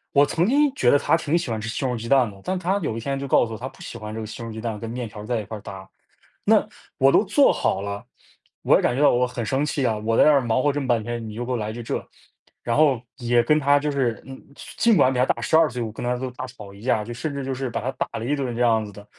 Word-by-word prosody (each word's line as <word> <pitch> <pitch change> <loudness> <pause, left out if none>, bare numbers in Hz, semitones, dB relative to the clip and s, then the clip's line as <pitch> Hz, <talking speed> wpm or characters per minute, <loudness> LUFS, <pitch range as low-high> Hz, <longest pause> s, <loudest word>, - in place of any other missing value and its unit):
我 140 +1 +6
曾 170 +6 0
经 285 +1 +3
觉 - - +2
得 145 - +6
他 160 - +2
挺 165 0 0
喜 130 -8 -3
欢 110 -1 -2
吃 115 - -4
西 135 - -3
红 125 - 0
柿 110 - -6
鸡 115 - -6
蛋 130 -5 +4
的， 100 -1 -14
但 185 0 -2
他 185 +3 0
有 115 - -3
一 - - -3
天 135 +3 -3
就 140 - -4
告 120 - +4
诉 115 - -7
我， - - -5
他 130 - -5
不 130 - -21
喜 - - -8
欢 105 -1 -7
这 110 - -5
个 110 - -5
西 115 +2 -8
红 115 - -6
柿 - - -8
鸡 110 - -7
蛋 110 -3 -4
跟 115 - -6
面 120 0 -4
条 105 -1 -10
儿 - - -8
在 120 0 -1
一 105 - -6
块 110 +1 -7
搭， 95 -2 -9 0.6
那 - - +4 0.3
我 135 +1 +5
都 215 - +4
做 270 +8 +4
好 95 - 0
了， 100 +3 -5 0.6
我 - - +5
也 - - +1
感 - - +1
觉 135 - -2
到 - - +7
我 125 +1 +2
很 125 -2 -5
生 135 +6 0
气 140 -3 -1
啊， 110 - 0
我 110 +2 -1
在 - - +7
那 155 - +6
儿 140 -2 +5
忙 120 +2 +1
活 145 - +3
这 145 - -2
么 135 - -3
半 120 -3 +1
天， 120 0 -5
你 105 - -8
就 120 +2 -4
给 - - -6
我 - - 0
来 110 -1 -3
句 120 +1 -7
这。 - - -4 0.6
然 120 - -1
后 140 -6 +4 0.2
也 120 -2 +2
跟 150 +6 +3
他 145 0 +4
就 150 +1 -2
是 125 -6 -1
嗯， 135 0 -9 0.4
尽 230 -2 +4
管 130 - +4
比 125 - -2
他 125 - +4
大 - - -1
12 160 -1 +4
岁， 125 0 -5
我 110 -2 -3
跟 115 - -7
他 125 0 0
都 130 0 -4
大 130 - -6
吵 105 -5 -12
一 100 - -14
架， 115 -4 +1
就 120 +2 -7
甚 145 +4 -4
至 140 - -4
就 135 0 -3
是 130 -1 -4
把 - - -3
他 130 +4 -2
打 - - -3
了 115 - -5
一 145 +4 0
顿 130 -4 -3
这 120 - -5
样 110 -2 +3
子 105 - -9
的。 105 +1 -13
125 Hz, 355 characters per minute, -23 LUFS, 110-140 Hz, 0.6 s, 到